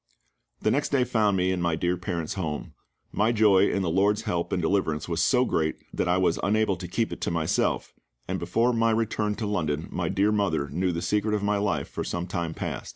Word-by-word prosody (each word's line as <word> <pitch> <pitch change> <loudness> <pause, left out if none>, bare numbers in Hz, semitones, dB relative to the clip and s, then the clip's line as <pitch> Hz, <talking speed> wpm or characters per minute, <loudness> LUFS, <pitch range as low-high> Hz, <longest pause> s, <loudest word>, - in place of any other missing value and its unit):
The - - +3
next 145 - 0
day 135 -3 +2
found 110 -5 +2
me 90 0 +1
in 90 -1 -1
my 85 -2 +1
dear 90 +2 0
parents' 85 -3 -3
home. 80 -6 -4 0.4
My 110 +3 +2
joy 105 -4 +4
in 100 - 0
the 85 - 0
LORD's 100 +4 +2
help 85 -1 -2
and - - 0
deliverance 80 -3 0
was 85 0 -1
so 125 -1 +3
great 80 -7 0 0.2
that - - -1
I 90 +1 +3
was 90 -2 +2
unable 110 0 +2
to 90 0 -6
keep 110 +6 -1
it - - -9
to - - 0
myself, 80 -2 0 0.3
and - - -2
before 115 +8 +1
my 115 0 +2
return 110 -2 0
to 110 - -4
London 80 -7 -1
my - - -2
dear 100 +2 +2
mother 100 -9 0
knew 90 +4 0
the 85 0 -3
secret 105 +1 +1
of 105 - -2
my 105 0 +1
life 105 0 -1
for - - -5
some 85 0 -3
time 85 -3 -3
past. - - -5
95 Hz, 225 wpm, -26 LUFS, 85-105 Hz, 0.4 s, joy